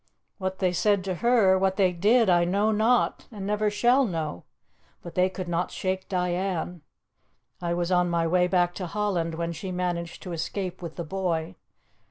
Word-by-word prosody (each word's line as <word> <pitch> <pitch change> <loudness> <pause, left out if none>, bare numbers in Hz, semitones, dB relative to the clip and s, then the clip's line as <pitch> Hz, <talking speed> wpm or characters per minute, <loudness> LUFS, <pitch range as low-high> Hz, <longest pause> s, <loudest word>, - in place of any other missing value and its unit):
What 190 0 -3
they 185 -2 +1
said 200 +1 +2
to 190 -1 -2
her, 225 -6 +4
what 190 0 +1
they 190 -2 +3
did, 215 +7 +3
I 175 -2 +4
know 200 +5 +2
not, 220 +3 +2
and 205 -4 -6
never 210 +1 +1
shall 245 +6 +3
know, 160 - -3 0.6
but 170 - -8
they 180 +1 +3
could 185 -1 -6
not 175 +1 -1
shake 190 0 -3
Diane. 180 -1 -2 0.8
I 170 -1 -1
was 175 +1 -1
on 180 -1 +3
my 170 -1 +1
way 180 +2 +3
back 175 -1 +2
to 185 - -4
Holland 175 -4 -1
when 170 +1 -2
she 185 +3 -6
managed 175 -2 -3
to 180 - -6
escape 180 +3 -4
with 170 -2 -7
the 170 - -4
boy. 170 -2 -2
185 Hz, 185 wpm, -26 LUFS, 175-200 Hz, 0.8 s, her